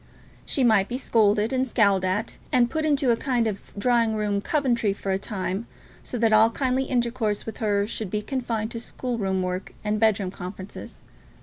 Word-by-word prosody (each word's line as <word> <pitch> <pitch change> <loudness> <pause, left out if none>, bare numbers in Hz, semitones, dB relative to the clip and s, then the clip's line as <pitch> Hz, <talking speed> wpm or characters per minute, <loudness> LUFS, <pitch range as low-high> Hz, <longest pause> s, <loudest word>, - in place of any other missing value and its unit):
She 270 - +1
might 215 -5 +4
be 250 - -3
scolded, 215 -2 +2
and 260 0 +1
scowled 200 -6 +3
at, 185 +3 -2
and 240 -1 +3
put 315 -1 -1
into 285 -4 +3
a - - +4
kind 245 -1 0
of 210 -3 -4
drawing 230 0 +2
room 205 -2 0
Coventry 240 -7 +1
for 195 -1 -4
a 190 - +1
time, 195 +1 -3 0.3
so 245 - -4
that 225 -1 +3
all 220 +1 +6
kindly 260 +2 0
intercourse 235 -4 -1
with 225 - -6
her 205 -2 +1
should 215 -2 -4
be 210 +2 -2
confined 230 -3 -2
to 230 - -4
school 240 0 -4
room 190 -2 0
work 180 +1 -4
and 210 0 0
bed 220 -2 +3
room 185 -2 -3
conferences. 185 +1 -8
220 Hz, 195 wpm, -25 LUFS, 200-245 Hz, 0.3 s, all